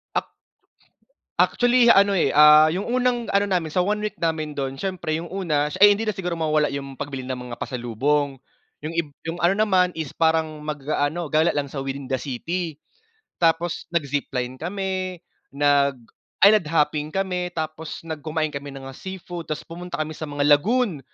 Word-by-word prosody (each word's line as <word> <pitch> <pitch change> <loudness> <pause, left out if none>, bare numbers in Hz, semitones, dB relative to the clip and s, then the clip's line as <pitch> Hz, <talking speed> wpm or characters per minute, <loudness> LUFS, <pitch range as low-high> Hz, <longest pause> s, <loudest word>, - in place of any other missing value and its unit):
Ac - - -1 1.1
actually 245 0 +4
ano, 200 +1 +5
eh, 175 -8 +2
ah, 150 +1 +8
yung 180 +5 -1
unang 245 -1 0
ano 200 +1 +3
namin 175 -5 -1
sa 180 - 0
1 210 +1 -1
week 210 - -37
namin 160 -2 -1
dun 135 -2 -3
siyempre 180 -1 -3
yung 165 +1 -5
una 150 -6 0
sh 185 - -6
ay 205 +1 +8
hindi 220 - -3
na 215 - +1
siguro 180 -3 -3
mawawala 155 -2 +1
yung 140 -2 -6
pagbili 135 -2 -5
ng 130 0 -4
mga 120 - -5
pasalubong, 135 +4 -1 0.5
yung 155 - -3
ib 165 -2 -1 0.2
yung 165 +1 -4
ano 175 +3 +3
naman 185 -4 +2
is 160 -4 -4
parang 160 -1 +1
mag-aano 150 +2 -2
gala 160 +2 +3
lang 140 -2 -2
sa 140 - -4
within 135 0 -5
the 130 - +1
city. 160 +6 -4 0.6
Tapos 165 0 +1
nag-zipline 140 -5 -2
kami, 185 +1 -3 0.3
nag-island 145 - +2
hopping 150 -1 +1
kami, 180 -2 -2
tapos 155 -1 -5
nag 160 -2 -6
kumain 155 0 -1
kami 140 -1 -7
ng 135 -1 -9
mga 135 - -10
seafood 180 -3 -7
tapos 155 - -4
pumunta 175 +1 -7
kami 155 0 -4
sa 155 - -4
mga 145 0 -2
lagoon, 215 - 0
160 Hz, 175 wpm, -23 LUFS, 145-180 Hz, 1.1 s, ah